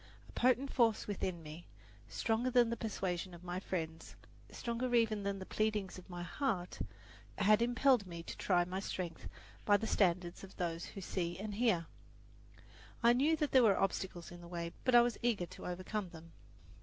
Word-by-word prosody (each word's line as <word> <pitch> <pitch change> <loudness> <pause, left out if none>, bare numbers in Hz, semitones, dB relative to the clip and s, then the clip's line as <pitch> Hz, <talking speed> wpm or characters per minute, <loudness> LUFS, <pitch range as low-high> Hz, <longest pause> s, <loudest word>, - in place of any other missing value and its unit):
A - - -14
potent 255 +2 +2
force 230 -4 +3
within 185 -4 -3
me, 155 +3 -9 0.4
stronger 230 +3 0
than 240 -2 +4
the - - 0
persuasion 185 -5 -3
of 170 - -14
my 180 0 -3
friends, 165 -4 -4 0.3
stronger 240 +1 -2
even 220 -3 +3
than 200 0 -2
the 190 - -7
pleadings 210 -3 -1
of 185 - -16
my 175 -1 -5
heart, 180 - -2 0.6
had 210 +2 +5
impelled 245 -2 +3
me 170 -1 -7
to - - -7
try 175 -2 +2
my 185 +2 -3
strength 185 -3 -4 0.4
by 205 -1 +5
the 225 - -4
standards 180 -4 +1
of 195 - -11
those 170 -2 -2
who 195 - -8
see 175 -2 -2
and 205 +2 -5
hear. 205 -6 +2 1.2
I 235 +1 +7
knew 285 +6 +3
that 300 -2 0
there 260 - +7
were 210 -5 +5
obstacles 190 -3 -2
in 175 0 -10
the 170 - -10
way; 170 -1 -4
but 255 -2 +4
I 240 - +10
was 240 -1 0
eager 230 -7 +1
to - - -9
overcome 185 +2 -3
them. 165 -1 -12
195 Hz, 185 wpm, -35 LUFS, 175-230 Hz, 1.2 s, I